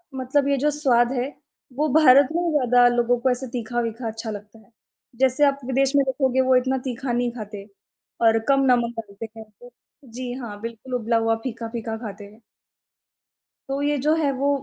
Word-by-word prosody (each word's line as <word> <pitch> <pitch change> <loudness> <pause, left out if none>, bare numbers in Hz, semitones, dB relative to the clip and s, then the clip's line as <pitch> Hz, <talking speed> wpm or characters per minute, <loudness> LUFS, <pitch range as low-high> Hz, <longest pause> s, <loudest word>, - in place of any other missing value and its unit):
मतलब 265 +2 0
ये 280 -1 +2
जो 295 +3 +1
स्वाद 250 -5 +2
है 255 0 -1 0.5
वो 300 +3 +1
भारत 280 -3 +7
में 345 - +1
ही 340 - 0
ज़्यादा 245 -4 +4
लोगों 240 0 +2
को 260 +2 +1
ऐसे 255 +1 -3
तीखा-वीखा 235 0 -3
अच्छा 225 0 -6
लगता 210 +2 -10
है। 230 +2 -24 0.5
जैसे 265 +2 +3
आप 280 0 0
विदेश 265 +1 +1
में 280 - +5
देखोगे 260 -1 +1
वो 260 - +6
इतना 260 +1 +1
तीखा 245 +1 -4
नहीं 240 0 0
खाते 210 -4 -8 0.6
और 225 0 +4
कम 275 0 +4
नमक 235 -1 +1
डालते 210 +1 -8
हैं। 220 - -9 0.7
जी 245 +1 -6
हाँ, 205 -3 -7
बिल्कुल 230 +3 -8
उबला 230 -1 0
हुआ 225 0 +1
फीका-फीका 230 -2 -5
खाते 210 -3 -8
हैं। 215 +3 -17 1.3
तो 275 +1 -2
ये 290 0 +1
जो 305 +1 +3
है 295 -4 +1
वो 270 +2 -1
245 Hz, 185 wpm, -23 LUFS, 225-270 Hz, 1.3 s, भारत